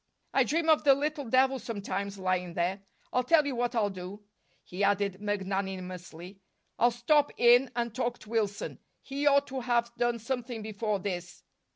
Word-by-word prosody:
I 270 - +5
dream 320 +6 0
of 315 -1 +5
the 275 -2 +6
little 295 0 -2
devil 260 +2 +3
sometimes, 200 -3 -4
lying 185 -2 -1
there. 180 +3 -1 0.3
I'll 250 - +2
tell 305 +3 +4
you 280 -3 -2
what 245 +1 -1
I'll 210 -3 +1
do," 190 +2 -8 0.4
he 185 +3 -4
added 200 -1 +1
magnanimously. 190 -3 -4 0.4
"I'll 240 - +5
stop 280 +5 +2
in 245 +2 +6
and 235 -2 -2
talk 240 -1 -2
to 210 - -14
Wilson. 210 -3 -2 0.2
He 280 +1 -2
ought 280 0 +5
to 265 -1 -5
have 235 -1 +1
done 240 -1 +1
something 235 -1 -4
before 215 0 -2
this." 180 -2 -5
230 Hz, 170 wpm, -29 LUFS, 195-255 Hz, 0.4 s, the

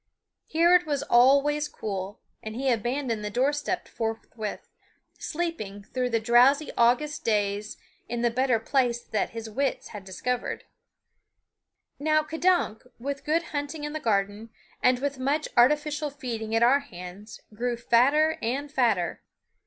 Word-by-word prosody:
Here 340 +2 +4
it 355 -2 +4
was 285 -2 -1
always 280 +4 +4
cool, 195 -5 -5 0.2
and 220 0 -7
he 265 +1 +1
abandoned 240 0 -1
the 210 - -2
door 255 +7 +1
step 295 +5 -3
forthwith, 225 -1 -5 0.5
sleeping 300 - -4
through 250 +4 -2
the 230 -1 +1
drowsy 245 +6 +4
August 250 +6 +2
days 210 -1 -1 0.3
in 235 0 -2
the 240 - +3
better 250 -1 +2
place 240 0 +1
that 220 -3 -2
his 225 -1 -7
wits 265 +5 -2
had 210 -3 -8
discovered. 215 +7 -3 1.4
Now 310 +1 +2
K'dunk, 320 -7 +1 0.2
with 280 +3 -5
good 325 +3 +1
hunting 290 +1 -3
in 295 0 -4
the 310 - -3
garden 205 -1 -1 0.3
and 250 0 +4
with 280 +1 -3
much 285 +4 0
artificial 295 +4 +3
feeding 230 -5 -4
at 225 - +3
our 260 +4 +5
hands, 190 -4 -10
grew 240 +2 -2
fatter 275 +7 +3
and 275 +5 -2
fatter. 230 -11 +1
250 Hz, 145 wpm, -26 LUFS, 225-290 Hz, 1.4 s, our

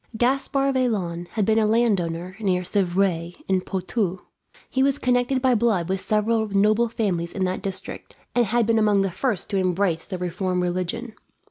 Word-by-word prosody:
Gaspard 275 +3 +1
Vaillant 190 -10 -1
had 215 -3 +1
been 220 +1 +3
a 215 - +3
landowner 185 -6 0
near 185 -4 0
Civray, 180 -2 0
in 190 -1 +2
Poitou. 190 0 -2 0.5
He 265 - -1
was 275 +1 +3
connected 250 +1 +1
by 260 -1 +4
blood 210 -7 +1
with 190 0 -1
several 220 +1 +1
noble 210 +4 +3
families 185 -7 -2
in 190 - -2
that 185 0 -1
district, 195 -2 -6 0.2
and 240 -2 +2
had 235 +2 +2
been 225 0 +2
among 210 -2 +3
the 195 -1 0
first 205 +1 -1
to 200 - +1
embrace 185 -2 0
the 185 - -4
reformed 180 +1 -2
religion. 185 +6 -3
200 Hz, 170 wpm, -24 LUFS, 180-230 Hz, 0.5 s, by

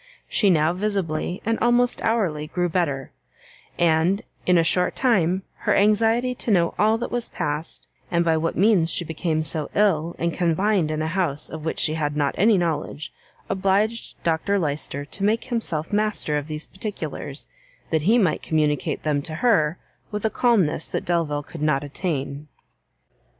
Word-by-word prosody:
She 205 - +2
now 160 -1 +3
visibly, 185 -3 -2
and 225 +1 0
almost 240 +1 +2
hourly 185 -10 0
grew 175 +2 -1
better; 145 -6 -1 0.7
and, 170 +4 +2 0.2
in 180 -1 +5
a 165 - +4
short 180 +2 +1
time, 190 -7 +2
her - - +1
anxiety 225 +4 +3
to 245 - -4
know 175 -5 +3
all 215 +2 +4
that 235 - -4
was 240 -1 +1
passed, 150 +2 -4 0.2
and 170 -1 +1
by 165 -1 +3
what 160 +1 -1
means 190 -4 +4
she 175 - +2
became 160 0 -1
so 155 0 -1
ill, 170 -5 +2
and 170 0 -1
confined 180 0 +1
in 155 0 -1
a - - -1
house 165 -4 -1
of 160 -1 -7
which 160 - -2
she 155 - +2
had 150 -2 -2
not 145 -2 +1
any 210 +2 +4
knowledge, 155 -3 -2 0.3
obliged 195 +4 0
Dr 170 +5 +1
Lyster 145 -4 -2
to 195 +7 -5
make 220 +3 +2
himself 210 -9 -2
master 210 -7 0
of 145 0 -2
these 155 0 -3
particulars, 160 -8 -6 0.4
that 160 -2 +2
he 215 +10 +4
might 190 -8 +2
communicate 150 -2 0
them 150 -2 0
to 155 +2 -4
her 175 -6 +2 0.3
with 210 0 -4
a 220 - +1
calmness 190 -11 +2
that - - -3
Delvile 160 -4 0
could 160 +1 -10
not 150 -2 +1
attain. 145 -2 -4
170 Hz, 170 wpm, -23 LUFS, 155-205 Hz, 0.7 s, in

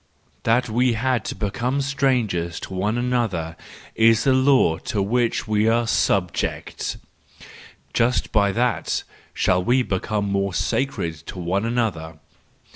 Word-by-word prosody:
That 125 +3 +3
we 120 +2 +2
had 125 +2 0
to - - -4
become 125 +6 -1
strangers 125 -12 0
to - - -7
one 105 +5 -1
another 115 -10 -1 0.4
is 115 0 +4
the 135 - +4
law 130 - +3
to 105 - -3
which 115 +4 0
we 105 0 +2
are 115 +1 +2
subject: 95 -3 -1 1.0
just 120 +2 +1
by 100 -2 +3
that 120 +4 0 0.3
shall 90 0 +2
we 125 +5 +3
become 100 0 -2
more 100 -2 -1
sacred 85 -7 -1
to - - -8
one 90 +4 -1
another! 100 -10 -2
110 Hz, 130 wpm, -22 LUFS, 95-125 Hz, 1.0 s, is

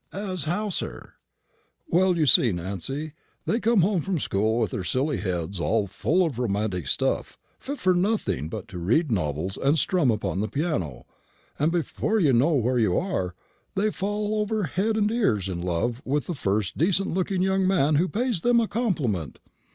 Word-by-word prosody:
"As 185 -5 -1
how, 205 +7 -1
sir?" 185 - -4 0.7
"Well, 180 0 +3
you 155 - +3
see, 125 -3 +6
Nancy, 100 - -4 0.3
they 230 - +1
come 230 -3 +3
home 185 0 +2
from 190 +2 -1
school 110 -4 0
with 110 -5 0
their - - -3
silly 135 +8 0
heads 90 -1 -3
full 105 - +1
of 135 -8 -3
romantic 100 - -1
stuff, - - -1 0.2
fit 285 +2 -5
for 185 -6 +2
nothing 180 - 0
but 105 - -6
to 90 -3 -7
read 120 - +1
novels 90 -1 -1
and 140 +4 +2
strum 170 -3 +2
upon 105 -4 -1
the 105 - 0
piano; 140 - -2 0.5
and 150 +3 +2
before 175 +6 0
you 150 -8 +3
know 135 +8 +3
where 125 -1 +1
you 105 -6 +2
are, 95 - -2 0.4
they 210 +2 +1
fall 210 +2 -2
over 210 0 -1
head 200 +7 0
and 210 0 +2
ears 115 - +1
in 90 -2 -4
love 90 +8 -1
with 145 +2 -1
the 175 - -3
first 100 - -1
decent 185 +3 +2
looking 185 0 0
young 190 0 +2
man 155 -6 +3
who 175 +5 +2
pays 230 -2 -1
them 240 +3 +4
a 225 - +1
compliment. 150 - -1
150 Hz, 180 wpm, -25 LUFS, -, 0.7 s, see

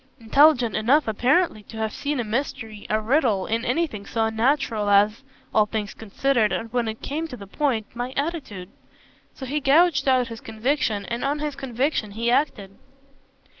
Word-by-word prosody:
"Intelligent 245 0 +4
enough 265 +7 +3
apparently 250 - +2
to 220 +2 -12
have 220 -1 -2
seen 290 -1 -2
a - - 0
mystery, 225 -2 -4
a 215 - +2
riddle, 220 -4 +1
in 225 +1 -1
anything 245 -7 -2
so 225 -1 0
unnatural 225 -1 0
as 205 +3 +4 0.3
all 215 -1 +4
things 210 -1 -4
considered 225 +1 0
and 225 0 -4
when 240 -2 0
it 220 0 -6
came 315 +4 -3
to 250 - -8
the 200 - -10
point 230 0 -1
my 245 +1 -4
attitude. 275 - -4 0.7
So 265 - -7
he 285 +4 -1
gouged 290 0 +3
out 255 -1 +3
his 230 -1 -8
conviction, 225 -2 -1
and 235 +3 -4
on 280 +2 0
his 295 -1 -3
conviction 265 -3 -1
he 230 +2 0
acted." 205 -8 0
235 Hz, 170 wpm, -24 LUFS, 215-280 Hz, 0.7 s, Intelligent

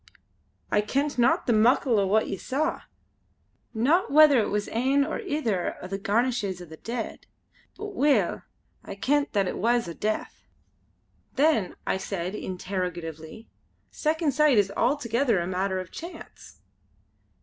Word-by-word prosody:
I 210 - +3
kent 275 +5 -1
not 240 - +3
the 240 - +2
muckle 230 +1 +3
o' 195 - +1
what 220 +3 +2
ye - - -3
saw. 290 - -2 0.9
Not 275 +11 +2
whether 295 -3 +7
it 215 - 0
was 210 0 -1
ane 270 +4 +2
or 315 - -3
ither 290 - -2
o' - - -8
the 195 +1 -4
garnishins 215 -2 0
o' 175 - -9
the 160 -1 -12
dead; 230 +4 -6 0.5
but 420 -1 -6
weel 275 - +2 0.4
I - - -8
kent 285 +7 0
that 200 -3 +1
it - - -4
was 235 0 +1
o' 170 - -5
death." 215 +5 -3 0.9
"Then," 280 - +2
I - - 0
said 190 -1 -4
interrogatively 180 -1 -5 0.4
"Second 315 0 0
Sight 295 -3 +4
is 200 -1 +3
altogether 240 -2 +1
a 170 - -2
matter 190 +1 -1
of 185 -2 -8
chance?" 340 +2 -11
225 Hz, 150 wpm, -26 LUFS, 195-280 Hz, 0.9 s, whether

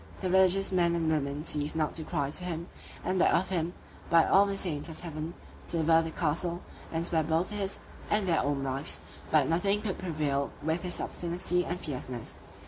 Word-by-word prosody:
The 185 - -1
religious 190 +1 +4
men 170 -2 +3
and 165 -2 +1
women 145 0 -1
ceased 150 -1 0
not 155 -1 0
to 160 - -1
cry 145 -4 -1
to 180 - 0
him, 170 -1 -4 0.4
and 185 0 +1
beg - - +5
of 185 - +1
him, 175 -2 -1 0.4
by 165 -1 +6
all 200 +1 +5
the 200 0 -2
saints 155 -5 0
of 160 - -8
heaven, 160 0 -5 0.3
to 170 - +1
deliver 160 0 +5
the 165 - -3
castle, 170 +2 -1 0.3
and 165 +1 -1
spare 165 -2 +2
both 160 +5 0
his 200 -2 -2 0.3
and 210 -2 +2
their 170 - +3
own 140 -1 0
lives; 135 +2 -1 0.3
but 150 -4 +4
nothing 195 +5 +2
could 195 -4 -2
prevail 150 -5 -1
with 160 +2 0
his 180 -1 -2
obstinacy 180 +1 -1
and 175 +1 -3
fierceness. 130 -6 -5
165 Hz, 200 wpm, -30 LUFS, 155-180 Hz, 0.4 s, by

